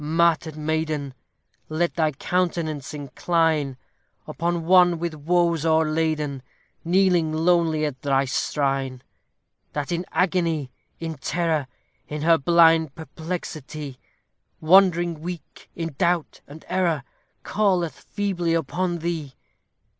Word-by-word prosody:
martyr'd 160 Hz, 0 st, +1 dB
maiden! 155 Hz, -2 st, -2 dB, 0.6 s
Let 165 Hz, +2 st, 0 dB
thy 155 Hz, -2 st, +1 dB
countenance 165 Hz, -3 st, -1 dB
incline 150 Hz, 0 st, 0 dB, 0.5 s
Upon 170 Hz, -1 st, -2 dB
one 180 Hz, -1 st, +5 dB
with 170 Hz, 0 st, -3 dB
woes 170 Hz, +1 st, +1 dB
o'erladen, 155 Hz, -3 st, +1 dB, 0.4 s
Kneeling 175 Hz, -2 st, +3 dB
lowly 160 Hz, -1 st, +2 dB
at 140 Hz, -3 st, -5 dB
thy 140 Hz, -1 st, +2 dB
shrine; 135 Hz, -1 st, -1 dB, 0.7 s
That 145 Hz, +3 st, -3 dB
in 175 Hz, +1 st, -2 dB
agony, 170 Hz, -7 st, 0 dB, 0.3 s
in 160 Hz, -3 st, -5 dB
terror, 160 Hz, -2 st, 0 dB, 0.4 s
In 150 Hz, 0 st, -5 dB
her 165 Hz, 0 st, +5 dB
blind 165 Hz, -1 st, +4 dB
perplexity, 155 Hz, -3 st, -6 dB, 0.6 s
Wandering 175 Hz, -1 st, +4 dB
weak 170 Hz, -3 st, -8 dB
in 165 Hz, -2 st, -4 dB
doubt 175 Hz, -2 st, 0 dB
and 150 Hz, +3 st, -12 dB
error, 170 Hz, -6 st, 0 dB, 0.4 s
Calleth 185 Hz, -8 st, 0 dB
feebly 180 Hz, -5 st, -1 dB
upon 175 Hz, +1 st, -1 dB
thee. 155 Hz, -7 st, -3 dB
160 Hz, 105 wpm, -24 LUFS, 150-175 Hz, 0.7 s, one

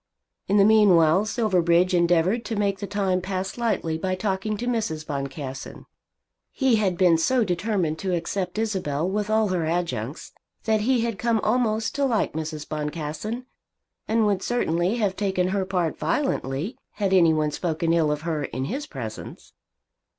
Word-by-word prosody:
In 200 Hz, -, +3 dB
the 200 Hz, -, +6 dB
meanwhile 195 Hz, -4 st, +5 dB
Silverbridge 185 Hz, -5 st, +2 dB
endeavoured 175 Hz, +6 st, +2 dB
to 225 Hz, -, -3 dB
make 200 Hz, -2 st, 0 dB
the 200 Hz, -, -4 dB
time 195 Hz, -2 st, 0 dB
pass 190 Hz, +1 st, -3 dB
lightly 210 Hz, -9 st, -1 dB
by 185 Hz, +2 st, -1 dB
talking 195 Hz, +2 st, -2 dB
to 240 Hz, -, -4 dB
Mrs. 215 Hz, -11 st, -2 dB
Boncassen. 140 Hz, -2 st, -6 dB, 0.7 s
He 265 Hz, -4 st, +2 dB
had 190 Hz, -5 st, 0 dB
been 175 Hz, -3 st, +4 dB
so 250 Hz, +8 st, +2 dB
determined 180 Hz, -4 st, -1 dB
to 190 Hz, -, -2 dB
accept 180 Hz, +3 st, -3 dB
Isabel 185 Hz, -8 st, -1 dB
with 205 Hz, +2 st, -2 dB
all 220 Hz, -1 st, +2 dB
her 175 Hz, -4 st, 0 dB
adjuncts 165 Hz, -6 st, -3 dB, 0.3 s
that 220 Hz, -1 st, +1 dB
he 245 Hz, +2 st, +2 dB
had 230 Hz, -3 st, -2 dB
come 235 Hz, -2 st, +1 dB
almost 225 Hz, -1 st, +1 dB
to 280 Hz, -, +1 dB
like 235 Hz, -5 st, 0 dB
Mrs. 155 Hz, -1 st, -5 dB
Boncassen, 155 Hz, +10 st, -4 dB, 0.6 s
and 220 Hz, 0 st, +2 dB
would 200 Hz, -2 st, +1 dB
certainly 180 Hz, -5 st, 0 dB
have 205 Hz, -5 st, 0 dB
taken 190 Hz, -3 st, 0 dB
her 190 Hz, 0 st, 0 dB
part 180 Hz, -4 st, -1 dB
violently 210 Hz, -, -1 dB
had 200 Hz, -2 st, -1 dB
any 170 Hz, -3 st, +6 dB
one 155 Hz, -1 st, +1 dB
spoken 165 Hz, +1 st, -1 dB
ill 160 Hz, -3 st, +2 dB
of 150 Hz, 0 st, -2 dB
her 155 Hz, -3 st, -2 dB
in 130 Hz, 0 st, -4 dB
his 280 Hz, -, -4 dB
presence. 110 Hz, -6 st, -8 dB
185 Hz, 165 wpm, -24 LUFS, 160-215 Hz, 0.7 s, the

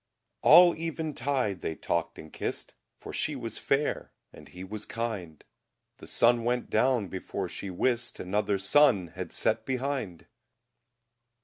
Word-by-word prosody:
All 175 Hz, 0 st, +8 dB
Even 160 Hz, -1 st, -3 dB
Tide 130 Hz, -10 st, -1 dB
they 80 Hz, -, -3 dB
Talkde 85 Hz, 0 st, -2 dB
and 80 Hz, -, -11 dB
Kist, -, -, -4 dB, 0.2 s
For -, -, -9 dB
She 150 Hz, -, 0 dB
was 115 Hz, -4 st, -4 dB
Fayre 140 Hz, +2 st, 0 dB, 0.2 s
and -, -, -13 dB
He 90 Hz, +1 st, -10 dB
was 105 Hz, +2 st, -6 dB
Kinde; 105 Hz, -9 st, -5 dB, 0.5 s
The -, -, -12 dB
Sunne 120 Hz, 0 st, +3 dB
went 125 Hz, +1 st, -1 dB
down 120 Hz, -2 st, +2 dB
before 95 Hz, +1 st, -4 dB
She 95 Hz, -, -6 dB
wist 120 Hz, +5 st, -1 dB
Another 100 Hz, +2 st, 0 dB
Sonne 100 Hz, -, +4 dB
had 90 Hz, 0 st, -7 dB
sett 110 Hz, 0 st, 0 dB
behinde! 130 Hz, -, -3 dB
115 Hz, 140 wpm, -28 LUFS, 95-130 Hz, 0.5 s, All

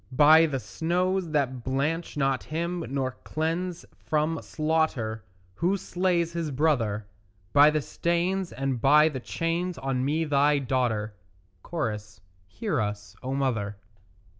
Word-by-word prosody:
By 160 Hz, +2 st, +7 dB
the 135 Hz, -3 st, -2 dB
snows 180 Hz, +5 st, -1 dB
that 130 Hz, -5 st, -1 dB
blanch 145 Hz, +6 st, -1 dB
not 135 Hz, -2 st, 0 dB
him 170 Hz, +2 st, -2 dB
nor 130 Hz, -1 st, -2 dB
cleanse 170 Hz, +3 st, -2 dB, 0.2 s
from 155 Hz, +1 st, 0 dB
slaughter 155 Hz, -9 st, -1 dB, 0.3 s
Who 180 Hz, -, +1 dB
slays 175 Hz, -3 st, 0 dB
his 165 Hz, -2 st, -2 dB
brother; 125 Hz, -8 st, +1 dB, 0.5 s
By 145 Hz, +1 st, +8 dB
the 155 Hz, -1 st, 0 dB
stains 175 Hz, +4 st, -1 dB
and 130 Hz, -1 st, -2 dB
by 150 Hz, +4 st, +6 dB
the 135 Hz, -4 st, -5 dB
chains 170 Hz, +6 st, -2 dB
on 130 Hz, -1 st, -1 dB
me 155 Hz, +4 st, +1 dB
thy 145 Hz, 0 st, +3 dB
daughter; 120 Hz, -5 st, -1 dB, 0.6 s
(Cho.) 150 Hz, -11 st, -1 dB, 0.5 s
Hear 200 Hz, -, -1 dB
us, 105 Hz, 0 st, -4 dB
O 130 Hz, +1 st, -3 dB
mother. 110 Hz, -7 st, -1 dB
150 Hz, 130 wpm, -27 LUFS, 130-165 Hz, 0.6 s, By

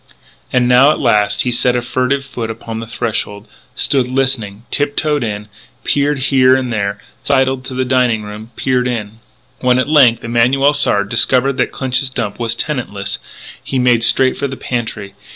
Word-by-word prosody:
And 125 Hz, -1 st, +2 dB
now, 125 Hz, +3 st, +6 dB
at 155 Hz, -, +1 dB
last, 105 Hz, -5 st, +2 dB
he 125 Hz, -, -1 dB
set 120 Hz, +1 st, +2 dB
a 120 Hz, -, 0 dB
furtive 130 Hz, +3 st, -1 dB
foot 120 Hz, -4 st, -5 dB
upon 115 Hz, 0 st, -6 dB
the 115 Hz, -, -7 dB
threshold, 110 Hz, -2 st, -3 dB, 0.3 s
stood 130 Hz, -1 st, +1 dB
listening, 125 Hz, -6 st, -1 dB
tip 145 Hz, 0 st, 0 dB
toed 150 Hz, -3 st, 0 dB
in, 105 Hz, -2 st, -4 dB, 0.4 s
peered 145 Hz, 0 st, +1 dB, 0.2 s
here 130 Hz, -1 st, +5 dB
and 130 Hz, -2 st, -2 dB
there, 100 Hz, -1 st, -2 dB, 0.2 s
sidled 130 Hz, -2 st, +1 dB
to 130 Hz, -, -7 dB
the 130 Hz, 0 st, -1 dB
dining 125 Hz, -4 st, +1 dB
room, 105 Hz, +2 st, -9 dB
peered 125 Hz, -1 st, 0 dB
in. 110 Hz, -3 st, -4 dB, 0.4 s
When, 125 Hz, -1 st, +2 dB
at 130 Hz, -, 0 dB
length, 135 Hz, -6 st, +4 dB
Emanuel 125 Hz, +5 st, +2 dB
Sard 100 Hz, -8 st, +1 dB
discovered 130 Hz, +3 st, +2 dB
that 125 Hz, -, 0 dB
Clinch's 130 Hz, 0 st, -1 dB
Dump 115 Hz, -5 st, -4 dB
was 115 Hz, -1 st, -1 dB
tenantless, 110 Hz, -9 st, -3 dB, 0.4 s
he 135 Hz, -, -3 dB
made 125 Hz, -2 st, +3 dB
straight 130 Hz, +2 st, +4 dB
for 140 Hz, +2 st, -2 dB
the 130 Hz, -1 st, -7 dB
pantry. 110 Hz, -5 st, -4 dB
125 Hz, 175 wpm, -16 LUFS, 115-130 Hz, 0.4 s, now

